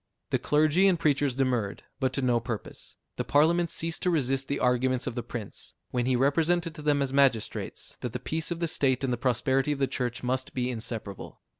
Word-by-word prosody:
The - - +2
clergy 155 +6 +3
and 180 -4 +3
preachers 145 -4 +2
demurred, 125 -6 0 0.2
but 130 -2 +1
to 135 - -1
no 120 -2 +3
purpose; 115 -2 -6 0.2
the - - 0
Parliament 165 +4 +3
ceased 165 +1 -3
to 180 - +2
resist 135 -5 0
the 140 - -1
arguments 125 0 +1
of - - -3
the 120 - -3
Prince, 115 -2 -7 0.2
when 125 0 0
he 130 - +3
represented 165 +6 +2
to 155 - -9
them 145 -1 +2
as 135 -1 -3
magistrates, 135 -5 0
that - - -3
the - - -4
peace 160 +1 -2
of 170 - -2
the 170 - 0
state 135 -4 +1
and 130 -2 +1
the - - -1
prosperity 130 +3 +1
of 145 - -1
the 135 - +2
Church 125 -2 -3
must 130 +1 -2
be 125 0 0
inseparable. 110 -4 -6
135 Hz, 210 wpm, -28 LUFS, 125-150 Hz, 0.2 s, clergy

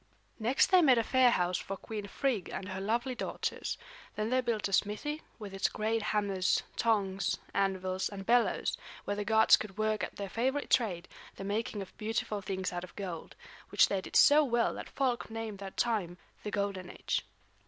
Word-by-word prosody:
Next 240 +10 +3
they 370 -1 +7
made 265 -6 +6
a 230 - +3
fair 260 +1 +5
house 180 -5 +1
for 195 - -5
Queen 210 -1 -6
Frigg 230 -2 -1
and 185 - -5
her 190 0 -4
lovely 235 +6 0
daughters. 240 - -3 0.4
Then 215 +2 -2
they 255 0 +3
built 230 -4 -1
a 195 - -6
smithy, 255 +11 0 0.2
with 205 -3 -8
its 195 - +1
great 220 +1 -1
hammers, 200 -3 +1
tongs, 195 -5 +1 0.2
anvils, 190 -1 0
and 195 -1 -7
bellows, 240 +2 +2 0.3
where 205 - -1
the 205 - -2
gods 220 +1 +6
could 205 -2 -7
work 215 0 0
at - - -4
their 200 - -4
favorite 260 +8 -1
trade, 185 -8 +2 0.3
the - - -7
making 205 0 -2
of 185 - -15
beautiful 215 -1 -2
things 190 -1 -3
out 175 0 -3
of 185 - -11
gold; 180 -5 -6 0.3
which - - +5
they 195 -1 0
did - - -9
so 300 +1 +7
well 240 -4 +1
that - - -7
folk 255 -5 -1
name 225 -2 -5
that 195 -1 -8
time 200 -7 0 0.2
the 210 - -4
Golden 200 -3 -2
Age. - - -2
210 Hz, 190 wpm, -31 LUFS, 195-230 Hz, 0.4 s, they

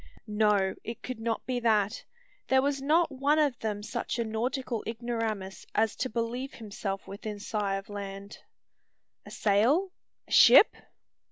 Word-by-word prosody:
No: 210 -3 +2
it 230 0 -7
could 255 -3 -5
not 225 0 -2
be 250 -1 -1
that. 215 -3 +1 0.4
There 265 0 +4
was 280 -1 0
not 315 +3 +3
one 280 +3 +1
of 290 -6 +2
them 210 -2 -3
such 235 +3 -3
a 235 - 0
nautical 235 +1 -2
ignoramus 225 -5 -4
as 220 0 +2
to 255 - -2
believe 235 +4 -3
himself 200 -3 -5
within 205 +1 -6
sigh 205 -1 -2
of 195 0 -6
land. 200 0 -7 0.9
"A - - -8
sail? 245 - +2 0.4
a - - -18
ship?" - - +8
225 Hz, 150 wpm, -29 LUFS, 205-255 Hz, 0.9 s, ship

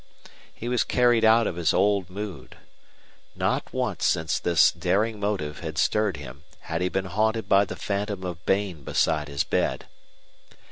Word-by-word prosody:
He 120 - -8
was 125 0 +1
carried 120 -2 +3
out 110 +1 +5
of 85 - -3
his 85 -3 +1
old 100 -3 +2
mood. 100 -1 -7 0.8
Not - - -1
once - - -2
since 80 -1 +1
this 85 -2 +4
daring 105 +2 0
motive 95 -8 -2
had 80 -2 -6
stirred 105 -1 +1
him 70 0 -10 0.2
had 80 +2 -4
he 90 - +1
been 95 +1 -2
haunted 110 +4 0
by 100 +1 +4
the - - -7
phantom 100 -1 -3
of 90 -1 -6
Bain 95 -6 0
beside 75 +2 0
his 70 -1 -1
bed. - - -1
95 Hz, 160 wpm, -25 LUFS, 80-105 Hz, 0.8 s, out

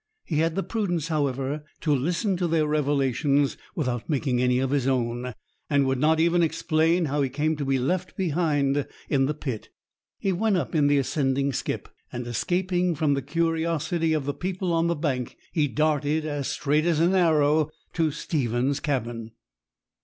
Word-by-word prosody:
He 155 - -2
had 165 0 +1
the 195 - 0
prudence, 175 -8 -2
however, 140 -1 -1 0.2
to 155 -3 +2
listen 175 - 0
to 175 -1 0
their 160 -2 +2
revelations 145 -1 +1 0.2
without 125 -5 -2
making 135 -4 +1
any 125 0 +3
of 130 +1 0
his 140 -3 +1
own, 125 -1 -1 0.3
and 140 -1 +3
would 130 -1 0
not 155 +3 +3
even 170 +1 +3
explain 165 +1 +2
how 145 0 0
he 135 - +1
came 150 +4 0
to 145 - -3
be 135 0 +2
left 180 +8 -2
behind 145 -5 +1 0.2
in 135 -2 +2
the 150 - -1
pit. 130 -7 -5 0.5
He 195 - 0
went 205 +2 +1
up 175 - -3
in 150 -3 +3
the 145 0 +4
ascending 140 0 0
skip, - - -3 0.2
and, 125 0 -5
escaping 180 +7 0
from 150 -1 +2
the 140 - 0
curiosity 165 +2 0
of 150 -3 -1
the 145 - -1
people 180 +3 -2
on 165 0 +2
the 170 - +1
bank, 135 -5 -2
he 150 -3 +2
darted 155 +1 +1
as 145 -3 -2
straight 150 +2 +1
as 165 -3 +2
an 170 +3 +3
arrow 155 -4 +3 0.2
to 165 -2 +2
Stephen's 135 -2 -1
cabin. 115 -6 -3
150 Hz, 175 wpm, -25 LUFS, 135-165 Hz, 0.5 s, the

